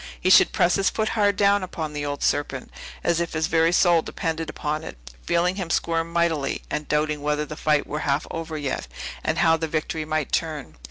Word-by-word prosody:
He 185 - +2
should - - +7
press 175 - +3
his 195 -1 +2
foot 220 -1 -1
hard 205 -2 +2
down 200 0 +3
upon 160 -4 -5
the 145 0 -3
old 145 0 -4
serpent, 140 -3 -1 0.3
as 170 -1 +2
if 170 -1 -2
his 160 0 0
very 165 +1 +3
soul 175 -2 +4
depended 160 0 -3
upon 155 +1 -3
it, 65 - -8 0.3
feeling 180 +2 +1
him 185 -4 -4
squirm 165 0 0
mightily, 165 -5 0
and 150 - -3
doubting 150 0 0
whether 150 +1 0
the 155 - -7
fight 150 -1 +1
were 150 - -4
half 145 -1 0
over 165 -1 -4
yet, 145 -3 -3 0.4
and 155 - 0
how 165 -1 +4
the 160 0 -2
victory 155 0 -2
might 155 -2 -2
turn! 150 - -2
160 Hz, 210 wpm, -24 LUFS, 150-170 Hz, 0.4 s, should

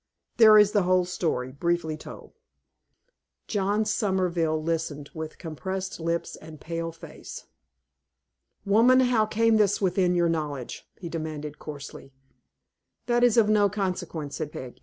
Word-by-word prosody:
There 220 -2 +8
is 210 -1 +6
the 205 -2 +3
whole 180 0 +2
story, 155 -8 -2
briefly 160 +2 -1
told." 155 - -11 1.1
John 205 +1 0
Somerville 180 -6 0
listened, 155 -3 -3
with 160 -1 -7
compressed 190 +4 -5
lips 170 +1 -2
and 155 -1 -12
pale 165 0 -4
face. 165 - -11 1.2
"Woman, 235 +6 +5
how 240 -4 +2
came 225 +1 +3
this 205 -1 +2
within 180 -2 +1
your 175 -1 +3
knowledge?" 150 -6 -4
he 175 - -7
demanded, 155 -2 -5
coarsely. 145 -2 -9 0.9
"That 240 0 +2
is 245 -1 +4
of 225 -2 +5
no 210 -1 +4
consequence," 180 -7 -4
said 155 -2 -4
Peg. 130 -4 -9
175 Hz, 135 wpm, -26 LUFS, 155-205 Hz, 1.2 s, There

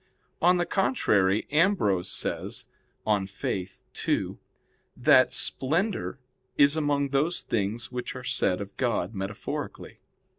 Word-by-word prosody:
On 180 +2 +5
the 175 - +1
contrary, 105 - +2
Ambrose 150 - +2
says - - -3 0.4
(De 105 -3 +1
Fide 95 -1 -3 0.4
ii) - - 0 0.6
that - - +5
"Splendor" 170 +7 0 0.4
is 140 +1 +5
among 145 -2 +1
those 150 +6 +1
things 110 +2 -2
which 125 +1 -4
are 125 - -7
said 95 -5 0
of 100 0 -8
God 115 -6 0
metaphorically. 95 +1 -5
125 Hz, 115 wpm, -27 LUFS, 100-155 Hz, 0.6 s, On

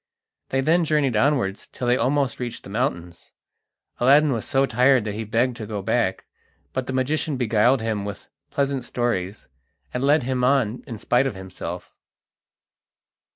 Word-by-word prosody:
They 135 - +1
then 165 +5 +3
journeyed 150 -6 +1
onwards 115 -5 +1
till 125 - -6
they 120 0 +3
almost 135 +1 0
reached 120 -2 -5
the 100 - -10
mountains. 85 -4 -3 0.7
Aladdin 140 +4 +5
was 115 -4 -2
so 135 0 +2
tired 125 0 +3
that 105 -1 -3
he 110 +2 -4
begged 115 +3 0
to 110 - -6
go 105 -2 -4
back, - - 0 0.5
but 130 -1 -3
the - - -2
magician 140 +3 0
beguiled 120 +1 +3
him 110 -3 -1
with 100 0 -7 0.2
pleasant 140 -2 -1
stories, 105 -6 -2 0.5
and 125 - -2
led 145 +1 +4
him 130 0 -1
on 125 -3 +2
in 115 -5 -6
spite 125 +5 +2
of 130 - -4
himself. 95 -1 -7
125 Hz, 160 wpm, -23 LUFS, 110-135 Hz, 0.7 s, Aladdin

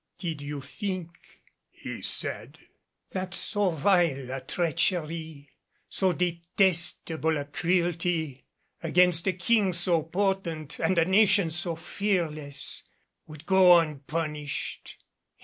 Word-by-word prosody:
"Did 160 -5 -4
you 145 0 -5
think," 185 +2 -7 0.3
he - - -8
said, - - -1 0.5
"that 185 0 -3
so 205 -2 +2
vile 160 -5 +1
a 135 0 -4
treachery, 160 -2 -2 0.4
so 190 -1 +1
detestable 170 -2 +1
a 145 - -4
cruelty, 170 -2 -1 0.3
against 175 +1 +2
a 190 - +2
King 195 +1 +2
so 175 -1 +3
potent 165 -3 -2
and 185 - +1
a 165 - +4
nation 195 -2 +4
so 170 +1 0
fearless, 165 -5 -3 0.5
would 155 0 -12
go 185 -2 +7
unpunished? 150 -1 -3
170 Hz, 105 wpm, -27 LUFS, 155-185 Hz, 0.5 s, go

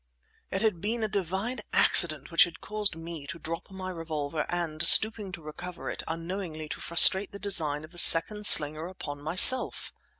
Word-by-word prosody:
It 195 +3 -6
had 205 -7 -3
been 225 +2 -6
a - - -3
divine 195 +5 -7
accident 155 -4 +1
which 170 +4 +2
had 170 -3 -15
caused 210 -4 -3
me 165 -3 -12
to 170 - -11
drop 165 +2 -11
my 190 -1 -11
revolver, 155 -3 -8
and, 165 -3 -7
stooping 210 +3 +3
to 170 -4 -12
recover 175 +4 -11
it, - - -10
unknowingly 165 -1 -9
to - - -10
frustrate 190 +3 +3
the 200 - -12
design 160 -8 -4
of 155 - -16
the 175 - -2
second 210 +7 +4
slinger 155 +2 +3
upon 145 -6 -12
myself. 185 - +4
170 Hz, 175 wpm, -24 LUFS, 155-195 Hz, -, second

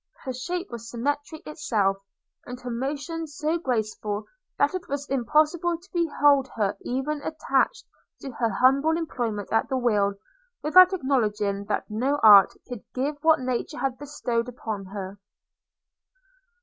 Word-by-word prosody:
Her 260 - -4
shape 350 +8 -4
was 230 -1 -7
symmetry 290 +6 -3
itself, 220 -11 0 0.5
and 250 0 -7
her 250 0 -5
motions 290 +5 -4
so 315 +3 0
graceful, 215 -6 -2 0.3
that 285 - +2
it 370 -1 -5
was 285 +1 -4
impossible 310 +6 +1
to 355 +3 -22
behold 290 -5 +3
her 205 -3 0
even 275 +4 -2
attached 310 - 0 0.4
to 270 - -6
her 230 -1 -1
humble 275 +9 +3
employment 235 - -3
at 225 - +2
the 265 - 0
wheel, 205 -5 +1 0.5
without 365 +5 +7
acknowledging 210 - 0
that 210 - -2
no 255 +7 0
art 205 -3 +9 0.2
could 245 -4 -7
give 285 +3 -1
what 320 -3 +4
nature 255 -1 -3
had 255 0 -2
bestowed 250 -5 -2
upon 220 -5 -5
her. 195 0 -7
260 Hz, 140 wpm, -25 LUFS, 225-300 Hz, 0.5 s, art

